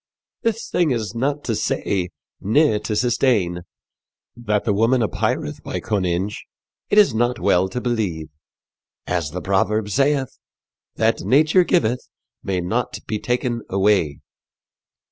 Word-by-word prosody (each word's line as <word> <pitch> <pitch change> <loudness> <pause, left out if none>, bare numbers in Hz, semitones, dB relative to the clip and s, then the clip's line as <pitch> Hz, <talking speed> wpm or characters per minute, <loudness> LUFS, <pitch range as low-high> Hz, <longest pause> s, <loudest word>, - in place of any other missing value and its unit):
This 230 -1 -1
thing 175 -3 +1
is 115 -5 -2
not 140 +5 -1
to 115 - -1
say 95 -3 -1 0.3
ne 110 +1 +3
to 105 - -3
sustayne. 105 -7 +1 0.7
That 105 -4 -1
the 105 - +2
woman 115 +4 +3
apayreth 105 - -2
by - - -4
conynge 95 -1 -1 0.5
it - - +1
is 205 - +6
not 120 +2 0
well 95 -1 +2
to 125 - -3
beleve. 105 -11 -2 0.8
As 85 -4 -1
the 90 +4 -5
proverb 100 +3 +1
saythe, 135 +3 +1 0.6
'that 115 +1 +1
nature 155 +7 +4
gyveth 125 -9 0 0.3
may 95 -2 -2
not 110 +8 -2
be 110 - -3
taken 120 0 -1
away.'" 95 -7 +1
110 Hz, 130 wpm, -21 LUFS, 95-125 Hz, 0.8 s, is